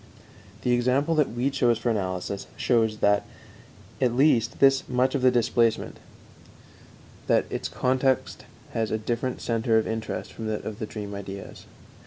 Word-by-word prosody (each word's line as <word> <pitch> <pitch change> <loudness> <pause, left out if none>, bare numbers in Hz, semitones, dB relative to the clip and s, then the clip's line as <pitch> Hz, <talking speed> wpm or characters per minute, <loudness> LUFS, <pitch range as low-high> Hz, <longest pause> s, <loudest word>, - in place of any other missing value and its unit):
The 125 - +1
example 130 +6 +2
that 150 -3 +2
we 125 +4 -1
chose 120 -4 +2
for 120 - -1
analysis 95 -1 -3
shows, 115 -3 +2
at 100 0 +4 0.8
least, 120 -2 +3
this 135 -1 +4
much 130 +1 +2
of 140 - 0
displacement 115 -1 +1 1.3
that - - +3
its - - -3
content 130 0 0 0.3
has 110 -1 -1
a 110 - 0
different 120 +3 -3
center 115 -1 +1
of 110 - +2
interest 110 0 -4
from 110 - -6
that 110 -1 -3
of 110 -1 -6
the 110 - -4
dream 105 -2 -6
ideas. 100 -1 -8
115 Hz, 145 wpm, -26 LUFS, 110-130 Hz, 1.3 s, at